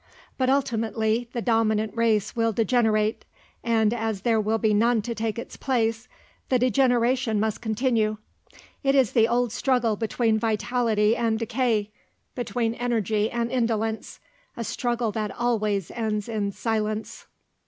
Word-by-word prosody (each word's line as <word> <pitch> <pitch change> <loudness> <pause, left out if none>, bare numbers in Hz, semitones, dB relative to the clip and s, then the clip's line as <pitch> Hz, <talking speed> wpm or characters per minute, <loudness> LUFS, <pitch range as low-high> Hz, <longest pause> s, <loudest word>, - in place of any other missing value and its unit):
But 260 -1 0
ultimately 230 -3 0
the 235 - -3
dominant 220 -2 +1
race 220 -3 +1
will 230 -1 +1
degenerate, 220 -1 +1 0.4
and 225 -2 +2
as 220 -4 -2
there 225 0 +2
will 215 +2 0
be 220 -1 +1
none 225 +1 +3
to 235 - -3
take 225 0 -3
its 235 - -7
place, 230 -2 -1 0.4
the 255 - +4
degeneration 245 -2 +2
must 220 0 -1
continue. 220 -1 0 0.7
It 275 0 +3
is 265 -5 +4
the 225 -2 +4
old 240 -1 +1
struggle 245 -3 +1
between 225 +1 0
vitality 225 -1 +1
and 225 -2 0
decay, 230 -2 0 0.4
between 240 -2 -1
energy 225 -3 0
and 235 0 -2
indolence; 225 -3 -1 0.4
a 235 - -3
struggle 240 -1 -1
that 215 -1 -2
always 215 -6 0
ends 215 -3 -2
in 210 -3 -2
silence. 215 0 -3
225 Hz, 140 wpm, -25 LUFS, 215-240 Hz, 0.7 s, the